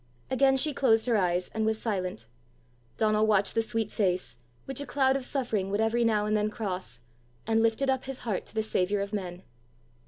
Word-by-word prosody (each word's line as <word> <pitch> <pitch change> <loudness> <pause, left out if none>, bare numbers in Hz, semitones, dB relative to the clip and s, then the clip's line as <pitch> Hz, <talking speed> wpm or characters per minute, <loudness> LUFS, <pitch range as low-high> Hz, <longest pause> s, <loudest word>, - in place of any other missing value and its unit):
Again 270 +1 +4
she 300 +2 +2
closed 225 -5 +3
her 240 -2 +2
eyes, 180 -2 +1
and 220 - -1
was 220 0 0
silent. 185 - -3 0.7
Donal 215 0 +2
watched 205 -2 +3
the 225 - +2
sweet 225 -1 -2
face, 180 - 0 0.3
which 270 0 -3
a - - -4
cloud 265 +1 +2
of 275 - -2
suffering 230 -8 -1
would 205 +1 -1
every 225 +2 +2
now 215 -2 +2
and 215 0 +1
then 210 0 +1
cross, 185 - -5 0.4
and 225 0 +2
lifted 230 +4 +1
up 265 -1 0
his 270 -1 -5
heart 210 -5 -2
to - - -12
the 220 - +1
saviour 200 -1 0
of 200 +1 -8
men. 185 -3 -4
220 Hz, 200 wpm, -28 LUFS, 195-240 Hz, 0.7 s, Again